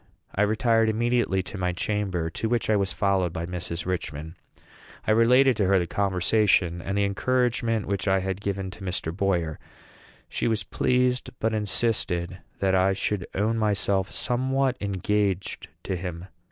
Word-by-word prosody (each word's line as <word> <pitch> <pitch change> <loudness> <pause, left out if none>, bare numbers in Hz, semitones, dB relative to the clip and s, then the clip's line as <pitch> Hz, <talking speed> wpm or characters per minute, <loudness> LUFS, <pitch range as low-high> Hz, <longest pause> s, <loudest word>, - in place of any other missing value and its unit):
I 95 - 0
retired 110 +1 +3
immediately 115 -4 +1
to 95 +2 -7
my 90 -1 0
chamber, 90 -3 -1
to 110 - -2
which 115 -2 +1
I - - +4
was 100 -1 +1
followed 95 -3 +1
by 85 0 -4
Mrs. 85 -1 -5
Richman. 80 -3 -4 0.7
I - - +2
related 125 +4 +5
to 105 - +2
her 100 0 +4
the 90 - +1
conversation 95 -2 +2
and 100 +3 -3
the 100 - +3
encouragement 115 +1 +1
which 100 +1 -2
I 95 0 +4
had 95 +1 -3
given 95 -2 -3
to 100 - -11
Mr. 90 -3 -3
Boyer. 90 -5 0 0.7
She - - -2
was 110 -2 0
pleased, 125 0 +1
but 110 0 0
insisted 100 -4 -1 0.2
that 95 -1 +1
I 95 +1 +4
should 100 -1 -2
own 110 +3 +1
myself 100 -2 +1
somewhat 130 +1 0
engaged 100 -1 -1 0.2
to 95 - -2
him. 90 -1 -5
100 Hz, 160 wpm, -26 LUFS, 90-110 Hz, 0.7 s, related